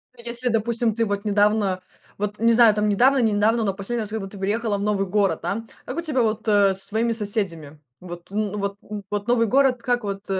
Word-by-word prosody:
Ну, 235 - -15
если, 240 +1 -1
допустим, 225 0 0
ты 230 +1 0
вот 205 0 -3
недавно, 205 -2 +2 0.4
вот, 210 0 -3
не 230 +1 +4
знаю, 230 -3 +6
там, 210 0 +1
недавно, 250 +7 +4
не 225 -4 +2
недавно, 220 +3 +2
но 195 -2 0
последний 210 +5 -3
раз, 210 - -3
когда 215 -3 -4
ты 200 +1 -11
переехала 210 +2 -1
в 200 - -5
новый 200 -1 0
город, 195 -4 +1
да. 200 +7 -3 0.2
Как 255 - -6
у - - 0
тебя 300 -6 0
вот, 220 0 -1
э, 205 -2 +4
с 190 - -3
твоими 230 +2 0
соседями? 190 -9 -3 0.2
Вот 175 0 -10
н 210 0 -2
вот 200 0 -3
н 210 -1 -7
вот 205 0 -3
новый 235 -1 +3
город, 260 0 +2
как 245 -1 0
вот, 200 0 -5
э, 190 -1 0
210 Hz, 235 wpm, -23 LUFS, 200-230 Hz, 0.4 s, знаю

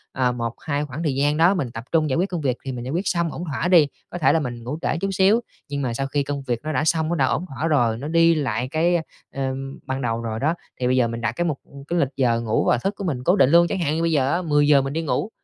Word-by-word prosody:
ờ, 125 -1 +2
một 115 -1 -4
hai 150 -3 -2
khoảng 145 +3 -6
thời 145 -5 0
gian 145 +2 +1
đó 170 +4 +5
mình 135 -10 -2
tập 115 0 -7
trung 160 -2 +2
giải 130 - 0
quyết 185 +4 +1
công 175 -3 -3
việc 130 -4 0
thì 135 - -3
mình 120 -2 -5
giải 130 - -4
quyết 180 +5 -1
xong 170 -2 0
ổn 170 - -6
thỏa 155 +1 -2
đi, 170 -5 +6 0.2
có - - -6
thể 165 - +3
là 165 - +3
mình 120 -5 -5
ngủ 130 +6 -4
trễ - - 0
chút 195 - 0
xíu, 195 +5 +4 0.3
nhưng 140 0 -3
mà 125 -3 -1
sau 135 +3 -2
khi 140 +1 0
công 140 0 -4
việc 120 -3 -2
nó 155 - -3
đã 155 - 0
xong, 160 0 +1
nó 175 - 0
đã 140 -5 +2
ổn 160 +6 -1
thỏa 145 +1 -3
rồi, 120 -8 +2
nó 140 +5 -6
đi 165 +1 +4
lại 125 -5 -1
cái, 170 +3 +2 0.4
ờ, 135 -1 -2
ừm, 135 +1 -5
ban 130 +1 -3
đầu 115 -2 -1
rồi 110 -1 -4
đó, 155 +6 +1 0.3
thì 125 - 0
bây 130 - +2
giờ 125 -2 +3
mình 115 0 -5
đặt 115 -1 0
cái 175 +9 -2
mục 150 -5 -2 0.3
cái 175 +1 0
lịch 140 - +2
giờ 120 -3 +2
ngủ 110 -1 0
và - - +3
thức 195 - -2
của - - -5
mình 140 -9 -2
cố 175 +7 +4
định 135 -10 +4
luôn. 170 +2 +6
Chẳng 190 - -2
hạn 155 -3 0
như 165 - -1
bây 165 0 +1
giờ 140 -3 +2
á 175 - 0
10:00 145 -3 +4
mình 135 +1 -4
đi 165 - -1
ngủ 165 +6 -1
145 Hz, 320 wpm, -23 LUFS, 130-165 Hz, 0.4 s, đi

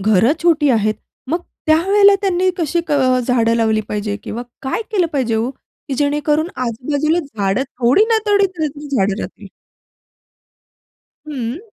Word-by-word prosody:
घरं 215 +6 +3
छोटी 310 -4 +3
आहेत 215 -2 +2 0.4
मग 335 - +1 0.3
त्यावेळेला 395 +6 +5
त्यांनी 370 -1 +1
कशी 340 0 -1
अ, 260 -3 +2
झाडं 230 -2 +2
लावली 220 -1 +2
पाहिजे 205 -1 -2
किंवा 235 +2 -5 0.2
काय 265 +12 -2
केलं 375 -6 +2
पाहिजे 250 -5 0
हो? 225 +3 0
की 270 0 -10
जेणेकरून 295 +2 +1 0.2
आजूबाजूला 285 +8 0
झाडं 220 - -1
थोडी 265 - +2
ना 450 -1 +3
थोडी 405 -1 +4
तरी 300 -2 -4
झाडं 205 -7 0
राहतील. - - -8 1.8
हं. 265 0 -4
280 Hz, 140 wpm, -18 LUFS, 230-330 Hz, 1.8 s, त्यावेळेला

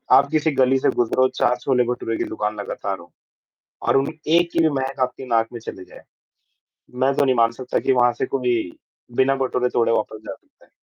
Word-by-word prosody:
आप 140 - +5
किसी 155 0 +2
गली 130 0 +4
से - - +2
गुज़रो, 125 +2 +2
4 125 - +2
छोले 125 -3 +2
भटूरे 120 -2 -3
की - - -1
दुकान 105 0 -3
लगातार 100 -1 -4
हों 85 - -14 0.8
और - - +4
उन 135 +2 0 0.3
एक 170 0 +1
की - - -1
भी 160 - +4
महक 135 0 -4
आपकी 130 - -11
नाक 115 -2 +1
में 120 - -6
चली 95 -4 -8
जाए, - - -15 0.9
मैं 130 +2 +1
तो 140 - +2
नहीं 130 -1 +2
मान 115 0 +4
सकता 125 - -1
कि 135 - +1
वहाँ 125 -1 +4
से - - 0
कोई 125 -3 0 0.6
बिना 135 +1 +4
भटूरे 125 -1 0
तोड़े 115 -1 +2
वापस 110 0 -2
जा - - -4
सकता - - -27
है। - - -28
125 Hz, 215 wpm, -22 LUFS, 115-135 Hz, 0.9 s, आप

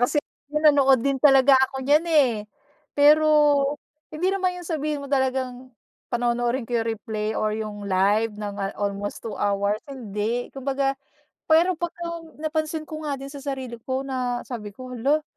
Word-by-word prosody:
Kasi 245 +5 +1 0.3
nanonood 285 -4 +4
din 275 -2 0
talaga 270 -1 +6 0.2
ako 265 -1 -6
niyan 300 +4 +4
eh. 290 -7 +4 0.6
Pero, 305 +2 +6 0.8
hindi 360 +5 -1
naman 370 -2 0
yung 355 - -8
sabihin 300 -3 -2
mo - - -6
talagang 260 -1 -1 0.4
panonoorin 240 +1 0
ko 235 0 -1
yung 225 - -2
replay 220 -1 -3
or 215 0 0
yung 215 -1 -5
live 200 +3 +2
ng 205 -1 -5
ah 195 0 -3
almost 200 0 -3
2 220 -3 -6
hours, 200 0 +1
hindi. 235 -3 -3
Kumbaga, 270 0 -1 0.5
pero 335 +3 +5
pagka-napansin 320 -2 -4
ko 310 0 -7
nga 280 - -1
din 275 +1 -9
sa 285 - -8
sarili 265 -4 -5
ko 260 +3 -3
na 250 -2 -2
sabi 210 -5 -7
ko, 255 +1 -9
"Hala, 280 +6 +1
265 Hz, 155 wpm, -24 LUFS, 225-300 Hz, 0.8 s, talaga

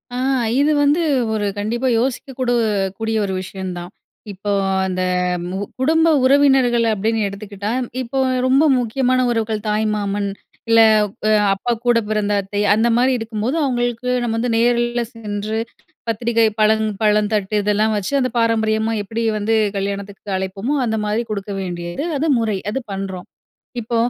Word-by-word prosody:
ஆ. - - -3 0.4
இதுவந்து 290 +2 +3 0.3
ஒரு 210 -1 -1
கண்டிப்பா 235 +5 -1
யோசிக்கக்கூட 255 0 -2 0.5
கூடிய 225 0 -1
ஒரு 190 - -3
விஷயந்தான். 185 -2 -6 0.4
இப்போ 200 +2 -6 0.4
அந்த 185 -1 -2 0.5
மு 190 - -4 0.2
குடும்ப 320 +5 +3 0.2
உறவினர்கள் 265 -3 +4
அப்பிடின்னு 220 +1 0
எடுத்துக்கிட்டா, 200 +1 -5 0.3
இப்போ 260 +2 -3 0.3
ரொம்ப 270 +3 +4 0.2
முக்கியமான 255 +2 +1
உறவுகள் 220 -2 -1
தாய் 210 +1 +1
மாமன், 205 -1 -2 0.4
இல்ல 230 0 +6 0.5
அ - - +3 0.2
அப்பாக்கூட 235 +3 0
பிறந்த 210 -1 0
அத்தை, 205 +1 -3
அந்தமாரி 235 +4 +3
இருக்கும்போது 225 +4 -3
அவுங்களுக்கு 245 -2 -1
நம்ம 230 -2 -1
வந்து 240 +1 -1
நேரில்ல 240 0 +1
சென்று 215 -1 -4 0.5
பத்திரிக்கை, 230 +1 +1
பழம், 220 0 +3 0.2
பழம் 210 0 +2
தட்டு 210 0 -1
இதெல்லாம் 210 +1 +1
வச்சு, 205 +6 -3
அந்த 255 -1 0
பாரம்பரியமா 220 -1 +1
எப்பிடி 225 +3 -4
வந்து 220 +2 0 0.2
கல்யாணத்துக்கு 200 0 -4
அழைப்போமோ, 195 +8 -3
அந்தமாரி 220 0 -1
கொடுக்க 200 0 -4
வேண்டியது 175 - -4
அது 310 +3 0
முறை. 220 -3 0
அது 265 +4 -2
பண்றோம். 190 -2 -5 0.5
இப்போ 230 +1 -2
220 Hz, 130 wpm, -19 LUFS, 205-240 Hz, 0.5 s, இல்ல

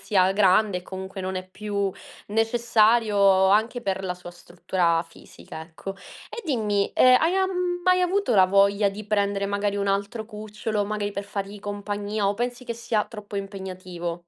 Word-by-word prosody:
sia 190 -2 +2
grande 195 0 +3
e - - -12
comunque 190 +1 -7
non 185 0 -3
è 185 0 -5
più 200 0 -3 0.4
necessario 225 -1 +2 0.3
anche 225 +4 +2
per 195 -1 -2
la 180 -1 -2
sua 180 0 -11
struttura 175 -1 -1
fisica, 165 -1 -12
ecco. 165 +4 -8 0.4
E 470 - -6
dimmi, 210 - 0
ehm, 255 0 +7
hai 335 +3 +2
am 380 0 +1 0.3
mai 365 0 +4
avuto 365 - +1
la 190 -2 +6
voglia 200 +1 +3
di 200 +2 -7
prendere, 200 -1 0
magari, 200 0 -1
un 200 0 -1
altro 200 +3 -1
cucciolo, 210 -1 -4
magari 205 -1 -3
per 200 0 -4
fargli 200 0 -6
compagnia 205 0 -3
o 200 - +2
pensi 245 +3 -4
che 235 - -3
sia 230 -2 -1
troppo 210 -2 -9
impegnativo? 185 -3 -5
205 Hz, 170 wpm, -25 LUFS, 190-215 Hz, 0.4 s, ehm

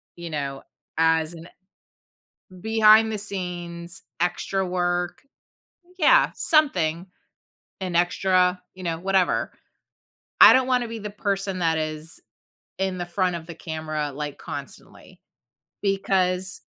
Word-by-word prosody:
you 170 -1 -8
know, 140 -3 -4 0.3
as 160 0 +2
an 165 0 -11 1.2
Behind 220 0 +5
the 215 - -3
scenes, 175 -4 -6 0.2
extra 190 +2 -1
work 175 0 -1 0.8
Yeah, 440 +9 +5
something, 185 - +2 0.7
an 185 -2 -4
extra, 180 +1 +2
you 185 - -11
know, 165 -2 -2
whatever. 190 +1 +1 0.9
I - - +11
don't 260 0 +4
wanna 250 -2 +1
be 230 0 -6
the 210 -1 -6
person 195 -2 -2
that 165 -2 +1
is 155 +1 -5 0.6
in 190 -1 -2
the 175 - -3
front 180 0 0
of 165 -1 -7
the 170 - -8
camera, 155 -2 -4
like, 145 0 -5
constantly, - - -10 0.6
because 190 -2 0
180 Hz, 120 wpm, -24 LUFS, 165-195 Hz, 1.2 s, I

